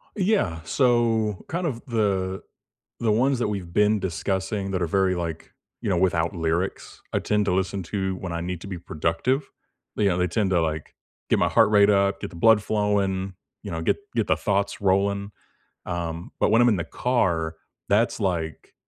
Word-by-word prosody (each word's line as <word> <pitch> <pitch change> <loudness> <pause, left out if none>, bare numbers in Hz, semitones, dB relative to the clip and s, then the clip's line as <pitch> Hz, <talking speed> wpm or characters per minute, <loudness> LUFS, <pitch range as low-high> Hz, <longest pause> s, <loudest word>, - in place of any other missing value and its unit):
Yeah, 185 - +1
so, 115 -4 +1
kind 175 +2 -2
of 120 -7 -3
the 95 -5 -1 0.6
the 115 -2 +1
ones 130 +4 +2
that 115 - +1
we've 95 -5 -4
been 105 +1 +3
discussing 95 +3 -2
that 95 - -1
are 85 - +1
very, 95 +1 +2
like 85 -2 -5 0.3
you - - -2
know, - - +2
without 85 0 +1
lyrics, 85 +3 -2
I - - +2
tend 105 -1 +1
to 95 - +1
listen 95 +1 -1
to 95 +1 -2
when 90 -1 -5
I 85 - -2
need 90 -1 -4
to - - -8
be 95 -3 -5
productive. 85 - -1 0.5
You 100 -2 +2
know, 90 - 0
they 90 - +2
tend 95 +2 0
to, 85 -2 +3
like, 80 -1 -3 0.4
get - - +3
my - - +3
heart 110 - +5
rate 100 0 +6
up, 100 -1 +2
get - - -4
the - - -13
blood 110 +4 +5
flowing, 100 -3 0 0.3
you 100 - -6
know, 80 - -3
get - - +1 0.2
get 115 -3 +1
the - - +2
thoughts 100 -1 -1
rolling, 100 +1 +1 0.5
um, 85 0 -4
but - - +3
when 115 +2 +5
I'm 120 - +6
in 110 - +3
the 85 - -1
car, 85 -7 0 0.3
that's, 110 +4 +2
like 85 -7 -3
95 Hz, 195 wpm, -25 LUFS, 85-105 Hz, 0.6 s, rate